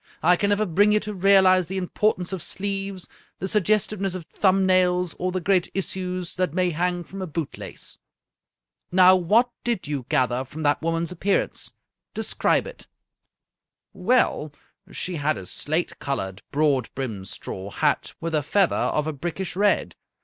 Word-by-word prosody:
I 180 +2 +6
can 200 +3 0
never 205 +1 +2
bring 205 +4 +3
you 210 - +4
to 210 0 -5
realize 190 -2 +5
the 190 +2 -3
impor 210 +4 +1
tance 180 +1 -6
of 185 - -3
sleeves, 195 0 -3 0.3
the 190 - -3
suggestiveness 205 -1 +1
of 175 -3 -6
thumb 190 +2 +2
nails, 180 -2 +2
or 185 +1 -1
the 185 - -1
great 185 0 +2
issues 185 -2 -3
that 180 -4 0
may 180 -1 +2
hang 175 +2 -1
from 195 +3 -9
a 185 - -3
boot 160 -1 -4
lace. - - -8 0.9
Now, 185 +1 +7
what 215 +8 +3
did 235 -9 -1
you 140 -4 -4
gather 125 0 +1
from 155 +4 -8
that 145 0 +2
woman's 165 +1 -1
appearance? 190 +3 -1 0.4
De - - -2
scribe - - +1
it." - - -10 1.1
"Well, 185 - +1 0.4
she 180 -2 -3
had 145 -4 0
a 95 - -8
slate 155 - -3
colored, 95 -8 -3
broad 140 -4 +2
brimmed 110 -8 -4
straw 95 +2 -7
hat, - - 0
with 165 0 -4
a 155 - +2
feather 190 +6 +2
of 150 - 0
a 155 - -2
brickish 175 +4 -4
red. 205 +1 +2
180 Hz, 170 wpm, -24 LUFS, 155-195 Hz, 1.1 s, Now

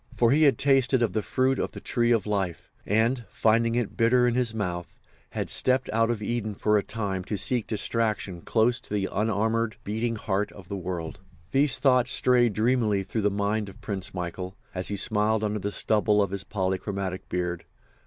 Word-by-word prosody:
For 120 -1 +4
he 150 +3 +3
had 145 -3 +5
tasted 135 -2 +3
of 105 -6 0
the 110 - 0
fruit 130 +5 0
of - - -2
the - - -7
tree 120 -1 0
of 115 -4 +2
life, 95 -6 -3 0.2
and, 115 +4 +1
finding 115 +1 +2
it 120 -4 -2
bitter 125 +2 +3
in 120 - +1
his 125 -2 +1
mouth, 90 -6 -4 0.3
had - - -3
stepped 130 0 +2
out 115 +1 +2
of 115 -3 -2
Eden 110 -2 -2
for 105 +2 +1
a 105 - +4
time 100 -4 -4
to 105 - -3
seek 120 +2 +1
distraction 110 -4 -1
close 120 +4 +1
to - - -18
the 100 -2 0
unarmoured, 110 +1 0
beating 115 +3 -2
heart 105 -1 -2
of 95 -3 -13
the 100 - -3
world. 90 -3 -5 0.3
These 135 0 +4
thoughts 130 -2 +3
strayed 120 -3 +4
dreamily 110 -2 +1
through 110 +3 -3
the 105 - +2
mind 100 +1 -1
of 95 - -14
Prince 95 -3 -4
Michael, 90 +1 -5 0.2
as 90 0 -3
he 100 - -3
smiled 110 +1 0
under 105 0 -1
the 100 +1 -3
stubble 105 0 +1
of 100 -2 +1
his 100 -1 -3
polychromatic 95 -1 -3
beard. 90 -1 -3
110 Hz, 195 wpm, -26 LUFS, 100-120 Hz, 0.3 s, had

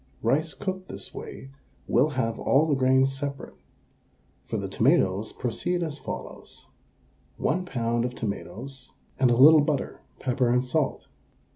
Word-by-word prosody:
Rice 150 +7 +1
cooked 190 -1 -4
this - - -7
way 65 0 -9 0.4
will 130 +6 +3
have 115 -2 -1
all 145 +4 +3
the 155 - +1
grains 130 0 +3
separate. 140 0 -5 0.9
For - - -2
the - - -3
tomatoes 95 +4 +2
proceed 175 +9 -2
as 150 -3 -5
follows: - - -7 0.7
1 180 +4 0
lb. 120 -5 0
of 125 0 -4
tomatoes 115 +6 -6 0.3
and 130 -2 +5
a 120 - +4
little 150 +4 +8
butter, 145 -1 -2 0.2
pepper 125 -1 +1
and 125 +1 +2
salt. 140 +2 -1
130 Hz, 140 wpm, -26 LUFS, 120-150 Hz, 0.9 s, little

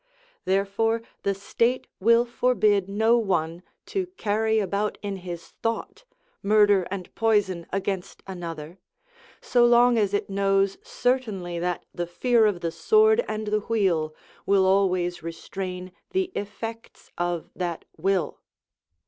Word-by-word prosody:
Therefore 200 +4 +1 0.2
the 200 0 0
state 230 +5 0
will 230 +4 +4
forbid 215 -5 +2
no 220 +4 +3
one 175 -5 -1 0.2
to 380 -2 -2
carry 220 +1 +1
about 205 0 -1
in 200 -1 -3
his 175 -2 -8
thought 390 - -3 0.4
murder 205 -3 +4
and 185 -2 -6
poison 205 -6 +1
against 195 -1 -3
another, 170 -2 -7 0.6
so 245 -1 +3
long 240 0 +5
as 205 -1 +1
it - - -1
knows 195 - +1
certainly 245 - -1
that 175 +1 -2
the 175 0 -3
fear 230 +5 +3
of 190 -4 -1
the 165 - -1
sword 435 - +4
and 215 0 -3
the 215 0 +2
wheel 185 -8 0 0.3
will 195 -1 +4
always 185 -2 +2
restrain 180 +2 -6 0.2
the 375 -1 0
effects 225 +3 -7
of 175 -1 -2
that 175 -3 -3
will. 185 0 0
200 Hz, 130 wpm, -25 LUFS, 180-225 Hz, 0.6 s, long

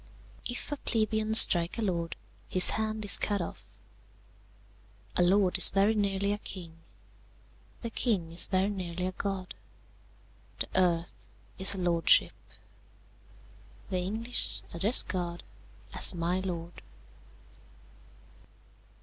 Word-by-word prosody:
"If 245 +4 -6
a 290 - -3
plebeian 220 -3 -1
strike 175 -4 +6
a 230 - -3
lord, 170 -4 -3 0.3
his 185 -1 +5
hand 220 0 -3
is 200 - +4
cut 205 -1 -1
off. 170 - -7 1.5
"A - - +1
lord 185 +1 +2
is - - +9
very 200 +3 +1
nearly 200 -1 -1
a 205 - -6
king. 170 -5 -9 1.1
"The 230 - -5
king 195 -10 -2
is 170 - +5
very 190 +1 0
nearly 180 -2 -5
a 185 - -3
god. 190 -1 -5 1.1
"The - - -4
earth 175 -2 -1 0.3
is 190 +1 +6
a - - -7
lordship. 175 -2 +2 1.6
"The 185 - -1
English 220 +6 -1
address 200 +9 +1
God 175 -2 -5 0.5
as - - +5
my 175 +2 -2
lord!" 175 -2 -7
190 Hz, 115 wpm, -28 LUFS, 175-210 Hz, 1.6 s, is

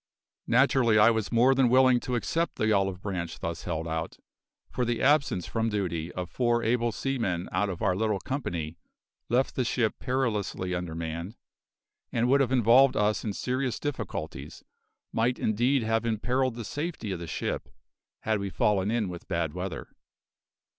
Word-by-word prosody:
Naturally 120 -2 +4
I 105 +2 +7
was 110 -2 -2
more 120 +3 +5
than 130 -2 +3
willing 130 0 +5
to 125 +1 -3
accept 165 +8 -1
the 110 0 +1
olive 95 -2 +1
branch 90 -4 -4
thus 85 0 -4
held 80 -2 -3
out, 80 0 -3 0.5
for 125 - -1
the 120 -1 -1
absence 140 - +2
from 115 0 -1
duty 90 -5 -2
of 90 -1 -4
four 120 +3 +1
able 120 +1 +1
seamen 110 -9 -2
out 100 +3 0
of 90 - -5
our 90 - +2
little 105 0 0
company 85 - -4 0.5
left 125 +3 +2
the 130 - 0
ship 115 -2 0
perilously 115 -7 -1
undermanned, 85 +2 -4 0.8
and 120 +1 +1
would 140 +1 +5
have 130 -2 +1
involved 125 +2 +5
us 105 0 +1
in 105 - -2
serious 125 +2 -2
difficulties, 130 -9 -5 0.5
might 120 +3 +1
indeed 120 +4 +1
have 115 +1 +1
imperilled 120 +3 0
the 115 -2 -6
safety 145 - -4
of 90 - -3
the 85 - -6
ship, 80 - -3 0.5
had 110 -1 0
we 100 0 -3
fallen 100 0 +1
in 115 -2 0
with 90 -1 -8
bad 85 -4 -1
weather. 90 +1 -5
110 Hz, 165 wpm, -28 LUFS, 95-125 Hz, 0.8 s, I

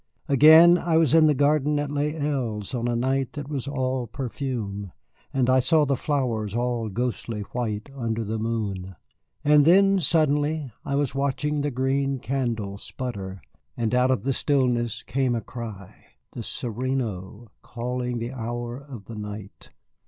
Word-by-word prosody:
Again, 160 +5 +8
I 165 -2 +1
was 160 -4 +3
in 160 -1 +7
the 150 - +3
garden 150 +1 +2
at 145 -1 -2
Les 145 +1 0
Îles 130 -10 -2
on 120 -1 -1
a 120 - 0
night 130 +2 0
that 145 -2 -6
was 140 -3 -4
all 130 -3 -1
perfume, 115 -6 -4 0.4
and 130 -2 +1
I 130 0 +5
saw 150 +4 +3
the 140 -1 +1
flowers 120 -7 -1
all 120 -2 -1
ghostly 115 0 -3
white 110 0 -3
under 115 -3 -2
the 110 +1 -3
moon. 100 -5 -3 0.5
And 150 0 +6
then, 195 +4 +5
suddenly, 150 -3 +1
I 140 - -2
was 140 -3 0
watching 140 +2 0
the 145 - 0
green 135 +1 0
candle 115 -7 -2
sputter, 100 -8 -6 0.3
and 115 0 -1
out 125 +1 +3
of 130 - +1
the 135 +1 +1
stillness 120 -5 0
came 130 -2 0
a 115 - -2
cry 110 -5 -9 0.3
the 120 - -6
sereno 115 -4 -4
calling 125 +1 -3
the 120 +2 -4
hour 120 0 -4
of 135 -8 -11
the 115 - -8
night. 105 -1 -8
125 Hz, 160 wpm, -25 LUFS, 115-140 Hz, 0.5 s, Again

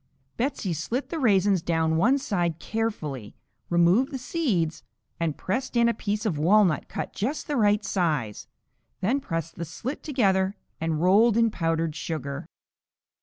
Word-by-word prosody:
Betsey 230 -7 -1
slit 225 - -3
the 330 - -3
raisins 200 - +3
down 160 -1 +1
one 235 +12 +4
side 175 - -1
carefully, 155 - -4 0.3
removed 175 +10 +4
the 270 - -3
seeds 240 - -1 0.4
and 165 -3 -1
pressed 255 +8 -3
in 235 0 +5
a 235 - +2
piece 210 0 -3
of 170 -9 0
walnut 180 0 +3
cut - - -5
just 260 +9 -2
the 295 - -2
right 210 -3 +3
size, 150 - -1 0.5
then 240 +9 +1
pressed 165 - -4
the 170 - -3
slit 225 - -5
together 195 -9 +1 0.2
and 160 0 -1
rolled 210 +5 +5
in 230 -1 +3
powdered 165 -3 -1
sugar. 140 -4 -4
190 Hz, 150 wpm, -26 LUFS, 165-230 Hz, 0.5 s, in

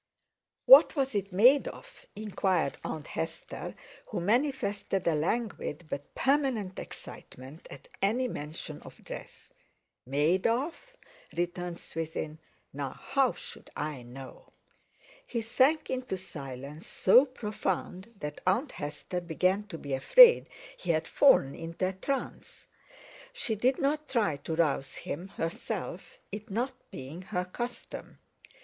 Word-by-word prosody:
"What - - +9
was 270 -3 0
it 200 -1 -1
made 245 +10 +6
of?" - - -11
inquired 190 -7 0
Aunt 155 -2 -4
Hester, 160 0 -5 0.3
who - - -3
manifested 205 -3 0
a 170 - +4
languid 175 -1 -1
but 145 - -5
permanent 265 -9 +1
excitement 130 +6 -10
at 135 - -11
any 235 +6 +2
mention 150 -7 -6
of - - -13
dress. - - -10 0.5
"Made 150 +7 +2
of?" 260 +8 +1 0.6
returned 175 0 -2
Swithin; 160 -1 -5 0.3
"now 140 -1 -3
how 270 -2 +2
should - - -11
I 150 -3 -3
know?" 130 +2 -11 0.8
He 235 - -2
sank 260 +7 +2
into 255 -6 -2
silence 140 -4 -8
so 240 +8 +6
profound 210 -4 -3
that 150 0 -5
Aunt 230 +11 +2
Hester 155 +4 -4
began 185 +4 +1
to 165 - -6
be 140 -3 -5
afraid 475 - +8 0.3
he 180 - -8
had 160 -1 +2
fallen 140 - +5
into 165 +3 -2
a - - -5
trance. 270 +9 -4 0.6
She 250 - -2
did 250 +5 +2
not 300 +2 0
try 210 - +1
to 160 +3 -4
rouse 150 -4 +1
him 175 +6 -5
herself, 165 -4 -5
it 210 +3 -6
not 240 +6 -1 0.2
being 135 +7 -8
her 180 -1 -2
custom. 240 +7 -6
185 Hz, 130 wpm, -30 LUFS, 155-240 Hz, 0.8 s, What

